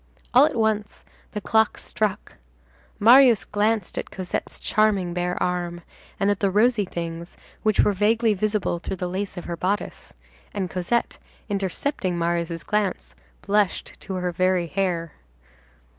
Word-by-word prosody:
All 265 +4 +7
at 310 - -4
once, 220 -2 -1 0.3
the 210 - -3
clock 220 +2 +2
struck. 210 -3 -3 0.6
Marius 235 -3 +7
glanced 210 -1 0
at - - -6
Cosette's 185 -2 -4
charming 200 -5 +1
bare 180 0 -1
arm, 175 -1 -2 0.4
and 200 0 +3
at 200 - -1
the 200 - +2
rosy 215 +1 +3
things 170 -1 -6 0.2
which 215 -1 +3
were 205 - +3
vaguely 215 +3 +2
visible 205 -3 -1
through 190 - -4
the 180 -1 -3
lace 190 +2 -4
of 175 - -6
her 170 - -3
bodice, 190 +5 -3 0.4
and 190 -3 -2
Cosette, 185 +6 -1 0.3
intercepting 195 - -2
Marius' 170 0 -1
glance, 210 -3 -1 0.3
blushed 205 -1 0
to 190 - -5
her 180 -1 -1
very 185 0 +1
hair. 170 -2 -1
195 Hz, 145 wpm, -24 LUFS, 180-215 Hz, 0.6 s, All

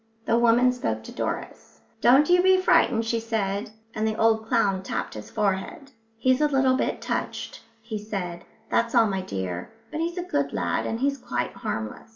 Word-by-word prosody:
The 230 - +2
woman 240 +2 +4
spoke 250 +3 -3
to - - -9
Doris. - - -5 0.2
"Don't 270 +5 +6
you 355 0 +5
be 375 0 +5
frightened," 240 -10 +3
she 230 0 0
said, 215 -1 -2 0.2
and 215 0 -1
the 220 - -1
old 220 0 +2
clown 205 -6 +2
tapped 190 - -4
his 105 0 -8
forehead. 200 - -2 0.3
"He's 255 +4 +2
a 300 - +5
little 265 -2 +3
bit - - -1
touched," - - -4 0.2
he 220 -2 -5
said, 190 -5 -5 0.3
"that's 235 +1 +1
all, 230 -1 +6
my 195 -3 -1
dear. 95 - -4 0.2
But 305 - -4
he's 340 +2 -2
a 355 - -1
good 360 - -1
lad - - -1
and 225 +2 -3
he's 275 0 +1
quite - - -3
harmless." 110 - -5
230 Hz, 190 wpm, -25 LUFS, 200-265 Hz, 0.3 s, Don't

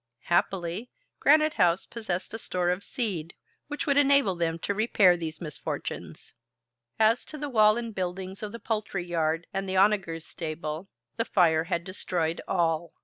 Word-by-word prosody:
Happily, 175 - 0 0.3
Granite 310 +1 +5
House 175 0 +3
possessed 195 -6 -4
a 225 - -4
store 180 -4 0
of 180 +3 -2
seed 180 -10 -3 0.3
which 295 0 -4
would 280 -1 +2
enable 280 -7 +4
them 165 -1 -1
to 200 - -2
repair 200 -4 +4
these 160 -2 -5
misfortunes. 155 -4 -6 0.6
As 220 +2 +4
to 305 - -8
the 290 0 -4
wall 215 -2 +5
and 230 -2 -4
buildings 190 0 -4
of 210 -1 -4
the 230 - -6
poultry 210 -5 -3
yard 165 -1 0
and 195 0 -2
the 190 - 0
onagers 190 -5 +2
stable, 155 +2 -5 0.3
the 230 - 0
fire 165 -6 +3
had 170 -1 -1
destroyed 175 -3 -2
all. 170 -2 0
185 Hz, 160 wpm, -27 LUFS, 170-220 Hz, 0.6 s, Granite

